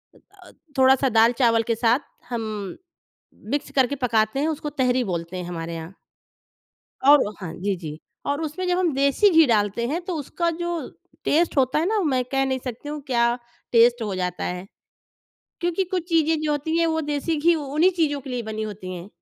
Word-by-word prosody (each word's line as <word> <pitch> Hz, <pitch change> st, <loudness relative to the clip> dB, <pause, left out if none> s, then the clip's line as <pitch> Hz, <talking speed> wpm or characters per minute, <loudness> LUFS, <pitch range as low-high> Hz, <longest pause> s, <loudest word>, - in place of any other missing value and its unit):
अ, -, -, -19 dB, 0.3 s
थोड़ा-सा 265 Hz, 0 st, +5 dB
दाल-चावल 230 Hz, 0 st, +4 dB
के -, -, +2 dB
साथ 235 Hz, +3 st, +3 dB, 0.3 s
हम 235 Hz, -2 st, -2 dB, 1.1 s
मिक्स 290 Hz, -, -2 dB
करके 265 Hz, +1 st, +2 dB
पकाते 220 Hz, +2 st, +1 dB
हैं, 300 Hz, -, +1 dB
उसको 305 Hz, -1 st, -3 dB
तहरी 250 Hz, 0 st, +2 dB
बोलते 175 Hz, -2 st, -4 dB
हैं 180 Hz, -, -4 dB
हमारे 165 Hz, -1 st, -5 dB
यहाँ। 165 Hz, +3 st, -7 dB, 1.1 s
और 280 Hz, -7 st, +6 dB
हाँ। 170 Hz, -4 st, -6 dB
जी, 200 Hz, -1 st, 0 dB
जी। 155 Hz, -3 st, -8 dB, 0.3 s
और 285 Hz, +2 st, -1 dB
उसमें 320 Hz, +4 st, -3 dB
जब 360 Hz, 0 st, +2 dB
हम 350 Hz, -5 st, +1 dB
देसी 280 Hz, +9 st, +3 dB
घी 325 Hz, -3 st, +6 dB
डालते 215 Hz, 0 st, +1 dB
हैं 325 Hz, +6 st, -2 dB
तो 370 Hz, -, -3 dB
उसका 335 Hz, +4 st, -1 dB
जो 345 Hz, +1 st, -3 dB, 0.5 s
टेस्ट 320 Hz, 0 st, +2 dB
होता 260 Hz, +2 st, +3 dB
है 320 Hz, -, +1 dB
ना 425 Hz, +3 st, +1 dB
मैं 260 Hz, -5 st, +1 dB
कह 270 Hz, 0 st, +2 dB
नहीं 260 Hz, -1 st, -1 dB
सकती 250 Hz, +3 st, -6 dB
हूँ, 300 Hz, 0 st, -5 dB
क्या 235 Hz, -1 st, +2 dB, 0.4 s
टेस्ट 235 Hz, +1 st, +5 dB
हो 205 Hz, -3 st, -3 dB
जाता 180 Hz, -1 st, -3 dB
है। 180 Hz, +1 st, -4 dB, 1.0 s
क्योंकि 350 Hz, +2 st, 0 dB
कुछ 360 Hz, -1 st, -3 dB
चीज़ें 325 Hz, -2 st, +2 dB
जो 305 Hz, -, 0 dB
होती 295 Hz, +2 st, -1 dB
है, 335 Hz, -, +3 dB
वो 320 Hz, 0 st, 0 dB
देसी 295 Hz, +2 st, -1 dB
घी 335 Hz, +3 st, +4 dB
उन्हीं 305 Hz, +3 st, +2 dB
चीज़ों 290 Hz, -4 st, +1 dB
के 265 Hz, 0 st, -9 dB
लिए 245 Hz, -1 st, -2 dB
बनी 220 Hz, -1 st, -4 dB
होती 205 Hz, -3 st, -6 dB
हैं। 175 Hz, +2 st, -8 dB
265 Hz, 190 wpm, -23 LUFS, 220-315 Hz, 1.1 s, और